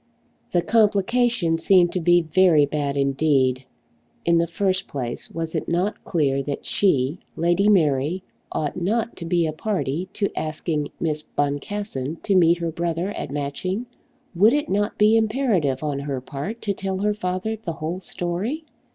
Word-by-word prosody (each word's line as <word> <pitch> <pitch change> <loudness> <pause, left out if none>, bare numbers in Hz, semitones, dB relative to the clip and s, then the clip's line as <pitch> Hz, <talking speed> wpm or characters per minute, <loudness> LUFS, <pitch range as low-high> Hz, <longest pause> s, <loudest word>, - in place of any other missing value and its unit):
The 175 -1 +2
complication 215 -4 +2
seemed 175 0 +4
to 185 - -1
be 175 0 +4
very 160 -2 +4
bad 140 -1 -2
indeed. 135 -2 +2 0.6
In 170 0 +4
the 170 - +1
first 190 +2 -1
place 125 -4 -5
was 165 0 -4
it - - -2
not 180 +5 -1
clear 140 -5 +1
that 140 +1 -5
she, 150 -4 +1 0.2
Lady 175 +5 +2
Mary, 160 -1 +2 0.3
ought 150 -2 -2
not 225 +5 0
to 170 - -6
be 170 0 +2
a 155 - -2
party 180 -2 -2
to 200 -1 -1
asking 155 -1 -2
Miss 155 -2 -1
Boncassen 145 +1 -3
to 200 - +1
meet 170 -2 +5
her 170 -1 -2
brother 170 +2 -2
at - - -5
Matching? 145 - -3 0.5
Would 205 +7 +5
it 295 0 0
not 205 +2 0
be 210 +1 +5
imperative 215 - +1
on 145 -2 -1
her 140 -2 -3
part 145 - -6
to 205 - 0
tell 190 0 -3
her 210 +2 +1
father 185 +2 -2
the 170 - -3
whole 160 +3 -4
story? 190 - -3
170 Hz, 160 wpm, -23 LUFS, 150-200 Hz, 0.6 s, meet